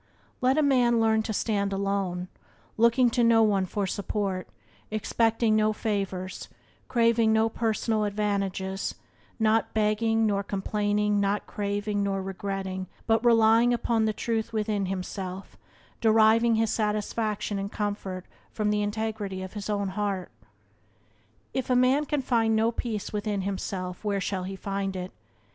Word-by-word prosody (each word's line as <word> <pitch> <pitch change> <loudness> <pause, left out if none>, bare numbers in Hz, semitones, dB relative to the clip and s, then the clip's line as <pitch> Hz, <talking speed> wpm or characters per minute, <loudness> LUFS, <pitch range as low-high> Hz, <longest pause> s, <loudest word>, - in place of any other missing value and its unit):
Let 260 +3 +3
a 310 - +4
man 245 -4 +3
learn 220 -1 +3
to 220 - -4
stand 200 -2 0
alone, 195 -2 -1 0.5
looking 235 +2 +4
to 240 0 +2
no 230 -1 +5
one 200 -3 +2
for 200 +2 -2
support; 195 -1 -2 0.4
expecting 225 +1 +1
no 215 0 +3
favours, 195 -4 -3 0.4
craving 230 -2 +3
no 220 +1 +3
personal 220 -1 0
advantages; 195 -2 -2 0.4
not 220 0 +1
begging, 220 +1 +2
nor 200 -2 +1
complaining, 205 +1 0
not 200 +1 0
craving, 205 0 -2
nor 195 -1 0
regretting, 190 0 -4 0.2
but 225 0 +2
relying 230 +1 +5
upon 230 -2 +1
the 215 - +2
truth 225 +1 -2
within 210 -3 -1
himself, 190 0 -5 0.5
deriving 225 +1 +5
his 225 0 +1
satisfaction 210 -1 -1
and 200 +1 -4
comfort 200 -3 -3 0.2
from 210 -1 -1
the 210 0 +1
integrity 205 -2 -3
of 190 - -8
his 205 -1 -6
own 200 -2 0
heart. 195 -2 -3 1.2
If 260 -1 -2
a 250 - +3
man 255 +4 +3
can 290 -1 -1
find 225 -3 +2
no 225 +1 +3
peace 225 -4 -4
within 205 -1 -1
himself 185 -1 -4
where 205 -2 0
shall 185 -1 -2
he 195 +1 -5
find 195 0 -3
it? 180 0 -5
210 Hz, 145 wpm, -27 LUFS, 195-225 Hz, 1.2 s, no